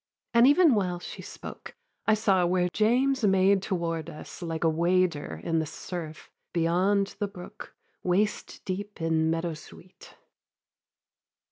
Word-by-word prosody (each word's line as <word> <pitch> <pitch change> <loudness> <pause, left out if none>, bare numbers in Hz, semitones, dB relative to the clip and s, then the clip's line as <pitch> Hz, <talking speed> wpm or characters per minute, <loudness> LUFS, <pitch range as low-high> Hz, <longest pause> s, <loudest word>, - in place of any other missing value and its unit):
And 235 +2 +7
even 310 0 +6
while 185 -5 0
she - - -8
spoke, - - -10 0.3
I 220 - +5
saw 195 -4 +2
where 180 0 +1
James 250 +7 +2
Made 195 0 +4
toward 170 -5 -2
us, 155 - -10
like 165 -1 -3
a - - +4
wader 165 - +1
in 165 -1 +1
the 160 - -2
surf, 160 0 -7 0.2
Beyond 185 +4 +1
the 205 - 0
brook, 180 -3 -11 0.3
waist 200 +4 -1
deep 205 +2 -5
in 160 -1 +1
meadow 165 +1 -1
sweet. 170 +4 -14
180 Hz, 135 wpm, -27 LUFS, 165-205 Hz, 0.3 s, And